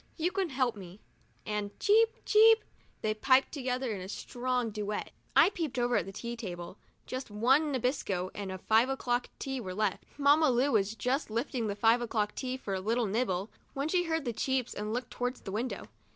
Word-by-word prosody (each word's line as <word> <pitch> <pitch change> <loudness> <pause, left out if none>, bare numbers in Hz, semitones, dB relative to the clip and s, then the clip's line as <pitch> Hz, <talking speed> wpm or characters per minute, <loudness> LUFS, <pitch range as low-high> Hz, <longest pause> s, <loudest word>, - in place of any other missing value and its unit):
You 345 +2 0
can 380 -2 -1
help 255 -4 0
me," 190 -1 -11 0.5
and 210 -1 -3
cheep! 450 +2 +5 0.2
cheep! 445 +1 +6 0.4
they 215 0 +1
piped 260 +5 +3
together 255 -3 -2
in 200 -3 -4
a 185 - -7
strong 245 +1 -2
duet. 210 0 -3 0.2
I - - +7
peeped 320 -10 -3
over 245 0 +2
at - - -1
the - - -6
tea 235 +4 -5
table. 180 -4 -7 0.3
Just 255 -1 -5
one 260 +9 +3
Nabisco 225 -8 -1
and 200 -2 -5
one 190 - -4
five 225 +4 +5
o'clock 245 -2 -1
tea 270 -2 -4
were 185 -4 -6
left. 210 -2 0
Mamma 290 +2 +5
Lu 255 +3 +2
was 210 0 +1
just 255 +5 -1
lifting 235 +1 -2
the 200 - -2
five 225 +3 +4
o'clock 215 -3 -1
tea 255 -1 -3
for 205 -6 -5
a 190 - -1
little 230 +4 +1
nibble, 200 -2 -1 0.2
when 275 +2 -1
she 355 +1 +2
heard 320 -3 -1
the 240 - -1
cheeps 260 +1 -1
and 210 +1 -4
looked 245 +2 -3
towards 245 +1 -3
the 195 - -7
window. 230 +5 -3
240 Hz, 200 wpm, -31 LUFS, 210-270 Hz, 0.5 s, I